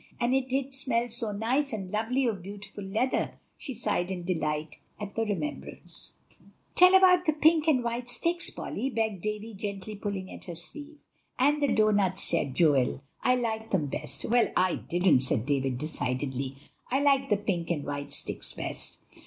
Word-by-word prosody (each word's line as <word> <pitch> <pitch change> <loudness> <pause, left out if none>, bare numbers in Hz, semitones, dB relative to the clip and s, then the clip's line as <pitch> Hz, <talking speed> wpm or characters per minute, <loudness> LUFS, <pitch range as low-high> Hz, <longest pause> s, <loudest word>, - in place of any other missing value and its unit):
And 240 +1 +1
it 265 -1 +1
did 270 +1 -1
smell 245 -3 0
so 230 -2 0
nice 245 +8 0
and 190 -4 -5
lovely 230 +5 0
of 215 -6 -1
beautiful 200 +2 -8
leather;" 220 +7 -1 0.2
she 265 -4 -5
sighed 180 -5 0
in 185 -2 -4
delight 155 -3 -2 0.2
at 205 -1 -6
the 225 - -1
remembrance. 220 +9 -5 0.6
"Tell 365 +1 +7
about 365 -1 +6
the 310 - +3
pink 315 +1 +4
and 265 -6 +3
white 235 +1 -3
sticks, 340 +8 +1
Polly," 270 - -4
begged 220 -6 -1
Davie, 215 +2 -4
pulling - - -10
gently 200 -1 -4
at - - -10
her 175 - -6
sleeve. 290 - -7 0.4
"And 290 +3 +3
the 285 - +3
doughnuts," 205 -3 +3
said 140 -6 +2
Joel; 140 -4 +3 0.2
"I 250 - +3
liked 225 -2 -2
them 175 -6 +1
best." 140 - -2
"Well, 240 0 +3
I 185 -1 +3
didn't," 175 -5 +3
said 125 -3 +3
David 135 -3 0
decidedly; 130 -2 -2 0.3
"I 265 - +2
liked 275 -1 +3
the 210 - +3
pink 190 -5 -2
and 155 -4 -1
white 145 0 -4
sticks - - -1
best." - - -2
215 Hz, 175 wpm, -28 LUFS, 175-260 Hz, 0.6 s, Tell